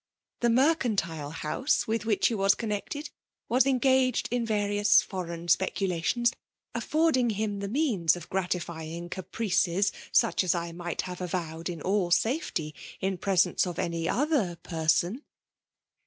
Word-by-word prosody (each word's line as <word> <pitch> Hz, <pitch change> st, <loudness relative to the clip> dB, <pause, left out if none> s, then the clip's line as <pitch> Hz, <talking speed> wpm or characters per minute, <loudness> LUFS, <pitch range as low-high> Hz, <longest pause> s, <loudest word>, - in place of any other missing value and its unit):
The 240 Hz, -, +2 dB
mercantile 230 Hz, -, +1 dB
house 160 Hz, -, -1 dB
with 225 Hz, +1 st, -2 dB
which 210 Hz, -3 st, +2 dB
he -, -, -2 dB
was 195 Hz, -2 st, +3 dB
connected, 230 Hz, +7 st, -4 dB, 0.4 s
was 255 Hz, +2 st, +3 dB
en* 265 Hz, -2 st, +3 dB
gaged 260 Hz, -2 st, +2 dB
invaiions 205 Hz, -3 st, +3 dB
fi^reigu 170 Hz, -3 st, -5 dB
speculations, 190 Hz, +6 st, +1 dB, 0.4 s
affiirding 300 Hz, -7 st, +1 dB
ktm 205 Hz, -1 st, -2 dB
the 200 Hz, -, -3 dB
means 215 Hz, -, +2 dB
of 175 Hz, -2 st, -9 dB
gratifying 170 Hz, -2 st, -3 dB
caprices, 190 Hz, 0 st, 0 dB, 0.2 s
such 230 Hz, -4 st, +3 dB
as 180 Hz, -1 st, +2 dB
I 170 Hz, 0 st, -3 dB
tnight 175 Hz, 0 st, -4 dB
have 180 Hz, 0 st, -7 dB
avowed 165 Hz, -2 st, -3 dB
in 170 Hz, -4 st, -6 dB
all 190 Hz, -1 st, +1 dB
safety, 175 Hz, -, 0 dB, 0.3 s
in 190 Hz, -1 st, -2 dB
presence 190 Hz, 0 st, +2 dB
of 175 Hz, -2 st, -5 dB
any 170 Hz, -1 st, -2 dB
other 265 Hz, -, +1 dB
person. 170 Hz, -, 0 dB
195 Hz, 135 wpm, -28 LUFS, 170-235 Hz, 0.4 s, was